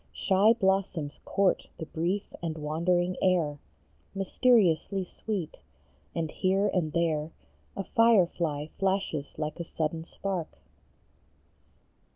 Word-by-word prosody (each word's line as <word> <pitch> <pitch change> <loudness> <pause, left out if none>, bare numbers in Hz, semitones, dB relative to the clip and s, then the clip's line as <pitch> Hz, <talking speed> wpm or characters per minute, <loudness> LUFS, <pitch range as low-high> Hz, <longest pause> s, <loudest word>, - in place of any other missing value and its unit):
H. - - -9
Shy 200 +3 +5
blossoms 190 -8 0
court 195 -1 +1
the 160 - -5
brief 175 +6 -2
and 165 -2 -3
wandering 175 +4 0
air, 165 -6 +2 0.6
Mysteriously 195 -3 +2
sweet; 190 -3 -5 0.6
and 160 -2 -2
here 195 +2 +1
and 165 -5 0
there 160 -1 0 0.5
A 195 - -1
firefly 175 -10 +3
flashes 190 -7 -1
like 150 +1 -4
a - - -2
sudden 160 0 -3
spark 185 - -4
175 Hz, 110 wpm, -29 LUFS, 160-195 Hz, 0.6 s, Shy